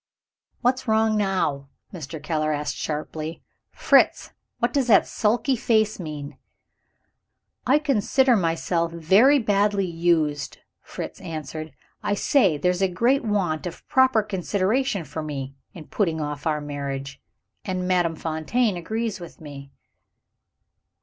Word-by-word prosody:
"What's 255 +1 0
wrong 220 0 +3
now?" 185 -9 0 0.2
Mr. 160 -3 -7
Keller 155 0 -1
asked 150 0 -2
sharply. 155 +1 -5 0.3
"Fritz! - - +3 0.3
what - - 0
does 275 -4 +1
that 225 - +6
sulky 235 +5 +1
face 220 -3 +1
mean?" 150 -4 -7 1.3
"I 270 +4 +5
consider 265 -2 +2
myself 170 -2 0
very 195 - +5
badly 205 -4 +1
used," 165 -4 0 0.2
Fritz - - -8
answered. 155 -1 -6 0.3
"I 205 - 0
say 200 - +3
there's 180 +4 0
a 190 - +4
great 235 +10 +1
want 185 -7 -1
of 175 - -10
proper 260 -4 +4
consideration 200 +3 -1
for 160 +2 -6
Me, 140 -3 -5 0.2
in 160 -4 -9
putting 165 -4 -1
off 150 0 -4
our 150 -1 0
marriage. 140 -1 -5 0.4
And 185 -1 -3
Madame 175 -3 +1
Fontaine 170 +8 -1
agrees 220 +5 -3
with 170 -2 -11
me." 140 -3 -10
180 Hz, 125 wpm, -24 LUFS, 155-215 Hz, 1.3 s, that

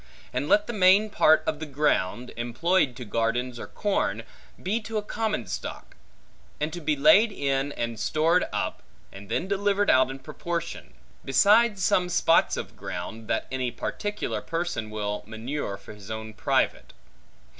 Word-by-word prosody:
And 145 - -2
let 210 0 +4
the 235 - -5
main 200 +1 +5
part 160 -4 +5
of 155 - -1
the 160 - -5
ground, 125 -5 0
employed 125 +5 +1
to 125 -1 -7
gardens 115 +3 -1
or - - -6
corn, 115 - -1 0.4
be 215 +5 0
to 220 +1 -4
a 210 - -1
common 215 - -2
stock; - - -6 0.6
and 150 +1 -2
to 175 - -6
be 155 0 +1
laid 160 +11 +6
in, 140 -3 -1
and 115 -4 -3
stored 165 +8 +2
up, - - -2 0.3
and 100 0 -11
then 180 - -1
delivered 200 +1 +2
out 130 0 +4
in 135 - -6
proportion; 170 +5 -5 0.3
besides 205 - +4
some 180 -1 +2
spots 170 -2 +3
of - - -6
ground, 110 +6 -6
that - - 0
any 130 -1 -1
particular 205 - -3
person 165 -10 -3
will 105 -1 -3
manure 110 -2 -4
for 100 - -12
his 105 -1 -13
own 110 0 -5
private. - - 0
150 Hz, 160 wpm, -26 LUFS, 115-185 Hz, 0.6 s, laid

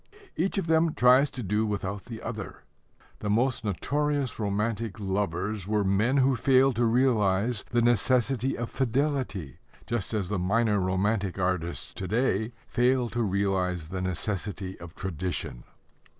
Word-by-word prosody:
Each 180 +6 0
of 195 - 0
them 160 0 +2
tries 130 +3 +5
to 125 -1 -6
do 105 +2 +1
without 100 -2 -3
the 115 -2 -8
other. - - -6 0.6
The 105 - -3
most 120 +3 +1
notorious 140 +7 -1
romantic 105 +1 -2
lovers 95 0 -2
were 105 -1 +1
men 105 +8 +2
who 135 0 +4
failed 130 +1 +4
to 120 - +3
realize 115 -3 +2
the 120 -1 +2
necessity 125 +2 +2
of 120 0 -4
fidelity, 130 - -1 0.3
just 115 -1 -2
as 100 -4 -1
the 105 -2 -1
minor 105 +3 +2
romantic 95 +1 0
artists 90 -2 -2
to 95 - -5
day 110 0 +1
fail 125 0 +2
to 120 - -2
realize 95 -5 0
the 95 0 -4
necessity 95 +1 -3
of 85 -1 -10
tradition. 90 -8 -4
105 Hz, 145 wpm, -27 LUFS, 95-125 Hz, 0.6 s, tries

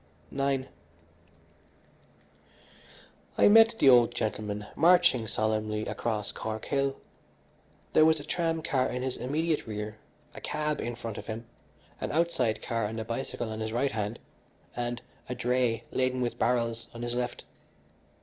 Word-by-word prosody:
IX 135 -1 +1 2.7
I - - +6
met 225 +2 +7
the 140 - +4
old 120 -2 +7
gentleman 105 -2 -2
marching 165 -9 +5
solemnly 110 0 -1
across 105 -3 -2
Cork 110 0 -5
Hill. 140 -1 0 1.0
There 155 - +7
was 160 0 +5
a - - -7
tramcar 160 -6 0
in 125 +1 -3
his 130 -1 -2
immediate 155 +4 -1
rear, 105 0 -5 0.3
a - - -9
cab 150 0 -1
in 120 0 -3
front 115 -3 -6
of - - -10
him, 115 +1 -5 0.5
an - - -3
outside 145 -9 +1
car 115 -2 -1
and 110 +2 -4
a 110 - -4
bicycle 115 0 -4
on 110 - -5
his 110 0 -3
right 130 +4 +1
hand, 105 +1 -2 0.6
and 120 0 -3 0.3
a 125 - -2
dray 125 -2 +1
laden 130 0 0
with 120 -1 -2
barrels 115 -1 0
on 120 - -6
his 120 0 -2
left. 120 0 -3
120 Hz, 145 wpm, -29 LUFS, 110-140 Hz, 2.7 s, met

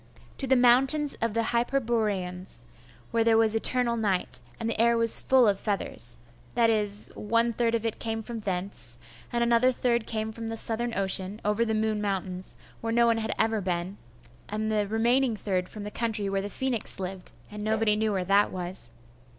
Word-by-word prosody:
To 270 - -3
the 265 - +4
mountains 265 +4 +4
of 230 -1 -1
the 230 -1 0
Hyperboreans, 215 - 0 0.5
where 230 -1 +2
there 225 -1 +4
was 225 -1 +3
eternal 235 +1 +2
night, 205 -5 0 0.2
and 230 - -3
the 225 -1 0
air 235 0 +4
was 230 -1 +4
full 260 -3 +4
of 200 -2 +2
feathers.... 195 - -2 0.4
That 230 -1 +4
is, 210 -1 -1
one 230 +2 +1
third 230 0 +1
of 230 0 -2
it 225 - -2
came 225 0 -3
from 235 0 -6
thence, 180 - -2 0.3
and 235 0 +1
another 235 +2 +4
third 235 -2 0
came 220 0 -2
from 225 +1 -7
the 225 0 -3
Southern 235 +1 0
ocean, 190 +1 +1
over 210 +2 +2
the 220 -1 -1
Moon 215 -1 0
mountains, 190 -2 -4 0.2
where 225 - -3
no 235 +1 +4
one 230 -1 +3
had 220 - -2
ever 220 -1 +1
been, 180 +1 -3 0.5
and 215 +1 -2
the 210 -1 +1
remaining 235 +3 +2
third 185 -3 -2
from 210 - -8
the 210 - -6
country 220 -3 -1
where 195 0 0
the 200 - -5
phoenix 250 -3 -2
lived, 185 -1 -5 0.2
and 210 0 -6
nobody 220 0 +2
knew 215 0 0
where 190 -3 -1
that 200 +2 +3
was. 180 -8 -5
220 Hz, 190 wpm, -27 LUFS, 200-235 Hz, 0.5 s, the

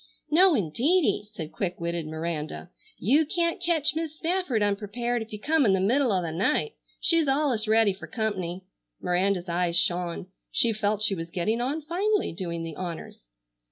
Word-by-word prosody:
"No, 360 +2 +6
indeedy!" 245 - +1
said 160 -2 -7
quick 180 -2 -4
witted 170 -1 -3
Miranda. 160 +1 -5 0.3
"You 275 - +3
can't 335 +3 -1
ketch 325 -4 +3
Mis' 320 -1 -3
Spafford 330 - 0
unprepared 220 +4 -2
if 225 - -8
you 210 - -5
come 310 +6 +2
in 205 -6 +3
the 190 - +2
middle 245 +6 +2
o' 185 -2 0
the 165 - -3
night. 295 - 0 0.3
She's 330 -3 +4
allus 270 -6 +1
ready 220 -2 +4
fer 190 - -11
comp'ny." 190 -5 -3 0.4
Miranda's 180 +1 0
eyes 175 0 +1
shone. 175 0 +1 0.3
She 230 -1 +3
felt 215 0 0
she 210 - +5
was 165 -2 -5
getting 215 +7 -1
on 290 +5 -2
finely 385 - 0
doing 170 -1 -4
the 165 -2 -6
honors. 170 - -7
210 Hz, 170 wpm, -26 LUFS, -, 0.4 s, No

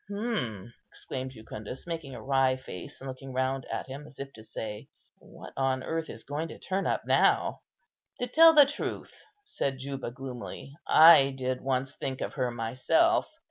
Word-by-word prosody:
"Hm!" 125 - -3 0.2
exclaimed 130 0 -6
Jucundus, 110 0 -8
making 165 -6 -5
a 110 - -9
wry 135 0 +3
face 110 -9 -9
and 135 - -8
looking 130 0 -7
round 130 0 -1
at - - -3
him, 140 +3 -8
as 135 - -14
if 135 0 -7
to 110 - -12
say, 105 -1 -7 0.3
"What - - -12
on 130 -1 0
earth 165 -1 -3
is - - -8
going 145 +3 -3
to - - -10
turn 190 +1 -2
up - - 0
now?" - - +3 0.6
"To 245 - -1
tell 325 +6 +7
the 295 -2 +9
truth," 285 - -5 0.3
said 140 - -2
Juba, 135 -1 -5
gloomily, 130 +1 -8
"I 155 -4 +8
did 130 -1 -2
once 135 0 -1
think 130 -1 -4
of - - -3
her 130 -3 0
myself. 130 - +2
135 Hz, 175 wpm, -29 LUFS, 130-160 Hz, 0.6 s, the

